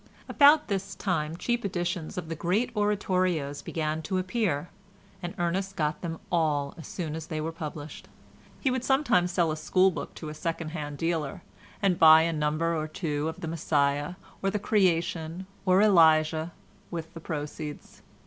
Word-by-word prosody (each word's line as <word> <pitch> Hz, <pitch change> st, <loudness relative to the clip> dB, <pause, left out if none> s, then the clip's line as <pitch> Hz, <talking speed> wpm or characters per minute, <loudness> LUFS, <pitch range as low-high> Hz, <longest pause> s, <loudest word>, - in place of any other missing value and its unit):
About 295 Hz, +1 st, +6 dB
this 195 Hz, -2 st, -3 dB
time 160 Hz, -4 st, -1 dB
cheap 240 Hz, +4 st, -1 dB
editions 175 Hz, -2 st, -3 dB
of 175 Hz, -3 st, -4 dB
the 165 Hz, -, -3 dB
great 200 Hz, +9 st, 0 dB
oratorios 185 Hz, -8 st, 0 dB
began 155 Hz, 0 st, -2 dB
to 185 Hz, +4 st, -2 dB
appear, 185 Hz, -5 st, -1 dB, 0.5 s
and 175 Hz, -1 st, -5 dB
Ernest 185 Hz, +3 st, -1 dB
got 150 Hz, -3 st, -1 dB
them 165 Hz, -2 st, -4 dB
all 150 Hz, -4 st, +1 dB
as 160 Hz, -, -10 dB
soon 160 Hz, -4 st, -4 dB
as 160 Hz, -1 st, -6 dB
they 155 Hz, -, -3 dB
were 160 Hz, +2 st, -2 dB
published; 155 Hz, -2 st, -7 dB, 0.5 s
he 265 Hz, -, +1 dB
would 255 Hz, -1 st, -1 dB
sometimes 245 Hz, -9 st, +2 dB
sell 170 Hz, -2 st, +2 dB
a -, -, -1 dB
school 185 Hz, +5 st, +3 dB
book -, -, -6 dB
to 155 Hz, -, -7 dB
a -, -, -6 dB
second 165 Hz, 0 st, -3 dB
hand 150 Hz, -3 st, -5 dB
dealer, 165 Hz, -3 st, -2 dB, 0.4 s
and 185 Hz, -3 st, +2 dB
buy 160 Hz, 0 st, +9 dB
a 165 Hz, 0 st, 0 dB
number 155 Hz, +2 st, 0 dB
or 155 Hz, -1 st, -2 dB
two 155 Hz, -2 st, -2 dB
of 160 Hz, -, -8 dB
the 165 Hz, -, -4 dB
"Messiah," 145 Hz, 0 st, 0 dB, 0.3 s
or 195 Hz, -, +1 dB
the 205 Hz, -, -1 dB
"Creation," 175 Hz, -4 st, 0 dB, 0.2 s
or 185 Hz, +2 st, +5 dB
"Elijah," 160 Hz, -4 st, +4 dB, 0.4 s
with 165 Hz, -2 st, -6 dB
the 165 Hz, -, -8 dB
proceeds. 150 Hz, -1 st, -6 dB
165 Hz, 170 wpm, -28 LUFS, 155-185 Hz, 0.5 s, buy